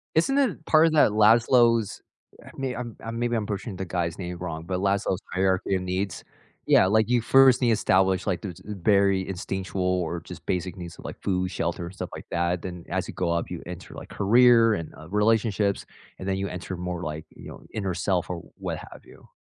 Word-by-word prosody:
Isn't 270 - +3
it 235 - 0
part 155 0 +5
of 160 - 0
that 150 -8 +5
Laszlo's 115 +1 +4 0.4
I - - -13
mean, 135 -2 -3
I'm 120 -2 -6
I'm 115 +1 -5
maybe 120 0 0
I'm 110 -2 -1
pushing 100 0 -4
the 95 +1 -4
guy's 85 -2 -2
name 90 -1 -5
wrong, 85 -3 -5
but 90 0 -2
Laszlo's 100 0 0
hierarchy 95 0 +1
of 95 - -1
needs. 95 +2 -3 0.4
Yeah, - - +5
like 110 +4 +2
you 125 -1 +3
first 130 +1 +6
need 125 - +3
to 115 - +5
establish, 95 -3 +2
like, 95 -4 -1
those, 90 -5 -7
uh, 105 - -3
berry 100 0 +2
instinctual 95 0 -4
or 90 -2 -1
just - - -11
basic 90 0 -2
needs 85 -2 -8
of - - -12
like - - -8
food, 95 -1 -1
shelter 85 -1 -2
and 90 - -10
stuff 95 - -5
like - - -9
that, 85 0 0
then 90 -1 -7
as - - -2
you - - -7
go 85 -2 -1
up 85 - -2
you - - -5
enter, - - -9
like, - - -9
career 115 +2 +5
and, 85 -5 -5
uh, 80 +2 -12
relationships, 105 -1 +1 0.3
and 95 - -6
then 95 - 0
you 100 - -2
enter 90 0 -6
more, 90 0 -4
like, 75 0 -5
you - - -11
know, - - -11
inner 100 -4 -2
self 90 0 -1
or 90 -2 -5
what - - -4
have - - -12
you. - - -17
95 Hz, 225 wpm, -25 LUFS, 90-110 Hz, 0.4 s, first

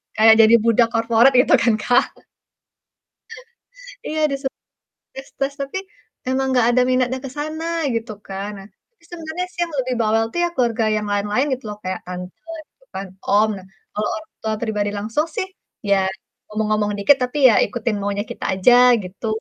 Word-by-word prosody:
kayak 220 +1 +7
jadi 220 +1 +6
budak 230 0 +4
corporate 230 +3 +4
gitu - - +1
kan, 230 -2 +3
Kak. 245 +2 +3 2.0
Iya 315 - -3
di - - 0
seb 270 - -2 0.6
tes-tes 275 +1 -4
tapi, 275 +7 -3 0.5
emang 265 +1 0
gak 235 - +4
ada 250 +1 +3
minatnya 255 0 +1
ke 270 - -5
sana 310 +2 -4 0.3
gitu 230 -1 -3 0.2
kan, 195 +1 -5
nah, 195 - -11 0.4
sebenarnya 335 +1 -5
sih - - -7
yang 335 - -10
lebih 255 -1 -1
bawel 225 0 +2
tuh - - -4
ya - - +1
keluarga 235 -4 +1
yang 210 0 -2
lain-lain 205 +6 0
gitu 255 - -12
loh, 210 - -8
kayak 185 0 -3
tante 180 - -9 0.2
gitu - - -30
kan, 195 +1 -5 0.2
om. 210 +2 +4
Nah 190 -1 -12 0.3
kalau 210 0 -2
orang 215 0 -10
tua 220 0 -1
pribadi 210 -3 -1
langsung 225 +10 -1
sih 410 -4 -1 0.4
ya 200 - +5 0.5
ngomong-ngomong 215 -1 0
dikit 265 +8 +5
tapi 250 +4 -2
ya 230 - +4
ikutin 225 0 -3
maunya 205 0 -2
kita - - -7
aja 190 +6 +5 0.3
gitu. 185 +5 -8
230 Hz, 170 wpm, -20 LUFS, 210-265 Hz, 2.0 s, kayak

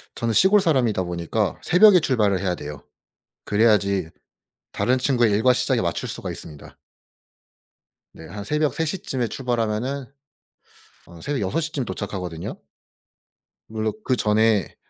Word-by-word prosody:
저는 115 -1 -1
시골 195 - +5
사람이다 120 - +1
보니까 85 -1 -2
새벽에 185 +1 +6
출발을 105 - +1
해야 90 -2 -1
돼요. 75 -2 -8 0.6
그래야지 100 -5 +2 0.6
다른 130 +1 +1
친구의 125 -3 +2
일과 110 +5 +3
시작에 - - 0
맞출 - - -2
수가 - - -5
있습니다. 75 -3 -10 1.4
네 80 - -12
한 100 +3 -7
새벽 150 +5 0
3 165 - -1
시쯤에 135 -7 -3
출발하면은 120 +2 -2 1.0
어 85 -2 -13
새벽 145 -5 -2
6 100 - -1
시쯤 150 -5 -3
도착하거든요. 90 -4 -5 1.1
물론 110 0 -2
그전에 110 -4 +1
110 Hz, 285 characters per minute, -23 LUFS, 100-135 Hz, 1.4 s, 새벽에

